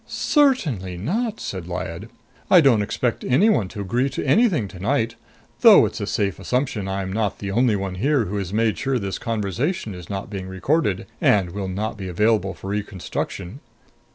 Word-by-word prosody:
"Certainly 155 - +1
not," 215 - -2
said - - -5
Lyad. - - -5 0.4
"I 180 - +8
don't 135 -9 +5
expect 115 +3 -1
anyone 130 - +3
to 100 +2 -7
agree 120 +8 0
to 135 - -4
anything 165 - +3
tonight 115 +6 -1 0.5
though - - +8
it's - - -4
a - - -3
safe 100 -2 -1
assumption 125 -6 -1
I'm 95 -1 -3
not 105 -1 -1
the 100 -1 -5
only 120 +1 +3
one 95 -2 -3
here 130 +5 +1
who 105 +2 -3
has 95 -3 -3
made 110 +1 +1
sure 135 -1 0
this 100 -4 -4
conversation 115 - -2
is 90 -2 -10
not 100 +2 -5
being 95 -2 -5
recorded, 95 - 0 0.2
and 95 -4 +3
will 100 +1 -4
not 105 +4 -3
be 95 - -5
available 100 +1 +1
for 95 - -7
reconstruction. 100 +1 -4
105 Hz, 175 wpm, -22 LUFS, 95-130 Hz, 0.5 s, I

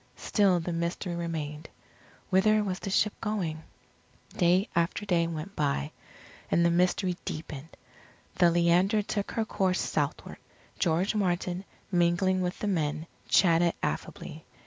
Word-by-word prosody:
Still 195 -4 +2
the 170 +1 -3
mystery 170 +1 -2
remained 160 -3 -4 0.6
whither 215 +3 +4
was 185 -2 -3
the 195 - -5
ship 205 +2 +2
going? 180 -8 -2 0.7
Day 180 +3 +3
after 170 +4 0
day 170 -4 +2
went 165 +4 -6
by, 140 - -1 0.6
and 170 - +3
the 170 - +4
mystery 180 +1 +1
deepened. 155 -1 -7 0.6
The 175 -2 +6
Leander 175 +5 +3
took 205 0 -3
her 225 - 0
course 190 -3 0
southward. - - -2 0.4
George 175 +3 +1
Martin, 180 -2 -1 0.3
mingling 175 +1 +2
with 180 0 -2
the 210 - -3
men, 155 -4 -1 0.2
chatted 170 -2 +4
affably. 75 - -4
175 Hz, 130 wpm, -28 LUFS, 165-190 Hz, 0.7 s, The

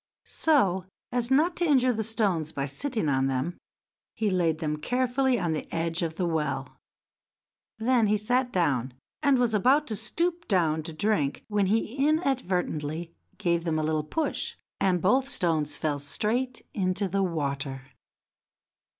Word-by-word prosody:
So 195 - +2 0.3
as 245 -1 0
not 310 +6 +3
to 350 - 0
injure 260 -5 +4
the 220 -1 -2
stones 200 -8 0
by 140 -2 -2
sitting 220 - -1
on 135 -1 +2
them, 135 +6 -2 0.6
he 215 -3 0
laid 170 -4 +2
them 155 -2 -2
carefully 250 - +1
on 170 -6 0
the 155 - -5
edge 165 +1 -1
of 165 -2 -2
the 180 - -1
well. 150 -5 -2 1.0
Then 230 0 +3
he 210 +1 +3
sat 245 +4 0
down, 135 - 0 0.3
and 280 -3 +4
was 245 -2 +2
about 260 +8 +4
to 220 - -1
stoop 335 - -1
down 165 -5 +2
to 160 - -6
drink 155 -4 0
when 205 -2 +2
he 220 +3 0
inadvertently 180 - -1 0.2
gave 170 -4 +1
them 165 -2 0
a 155 - 0
little 155 0 +1
push, 310 - -2 0.2
and 180 -3 +2
both 255 +8 +4
the 275 - -9
stones 155 -4 0
fell 150 -2 -1
straight 230 - -1
into 190 0 0
the 195 +2 0
water. 140 -6 -2
185 Hz, 160 wpm, -27 LUFS, 155-245 Hz, 1.0 s, injure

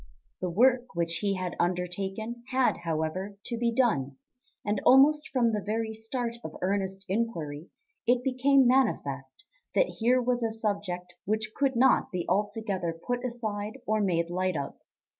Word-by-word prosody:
The 180 - -1
work 245 +5 +3
which 170 0 0
he 200 -2 0
had 185 -1 -3
undertaken 190 +6 -2
had, 260 -1 +2
however, 170 +4 -3
to 235 - -3
be 235 0 +1
done, 215 - +1 0.5
and 205 -1 0
almost 295 +3 +6
from 240 -3 +2
the 210 - 0
very 220 +1 -2
start 235 +2 -4
of - - -7
earnest 195 0 -1
enquiry 170 -8 -2 0.4
it 245 +1 +3
became 265 +1 +4
manifest 145 - 0 0.3
that - - +2
here 245 +3 +4
was 250 0 0
a 230 - +1
subject 200 -5 -3
which 215 +1 -1
could 275 -2 +1
not 260 +3 +4
be 180 -2 -2
altogether 200 -5 -1
put 245 0 -1
aside 220 -2 -3
or 215 0 +1
made 170 -3 +1
light 185 -1 0
of. 140 - -4
215 Hz, 155 wpm, -28 LUFS, 180-240 Hz, 0.5 s, almost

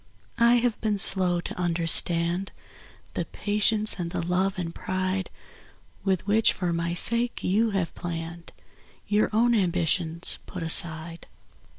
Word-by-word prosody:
I 235 +1 +5
have 240 -2 -1
been 215 -2 -1
slow 185 -3 +4
to 175 - -8
understand 170 +1 +2 0.6
The - - -3
patience 210 0 0
and 170 -1 -3
the 175 -1 -4
love 185 +2 -1
and 170 -2 -5
pride 185 +1 -3 0.7
"With 190 -2 -1
which 215 +2 +2
for 175 -3 -3
my 170 +1 -3
sake 235 +6 +2
you 215 +5 +1
have 190 -5 -2
hour 170 +5 -5
own 235 +3 +2
ambitions 175 -4 +1
put 180 -4 -7
aside. 165 0 +1
185 Hz, 125 wpm, -25 LUFS, 170-210 Hz, 0.7 s, I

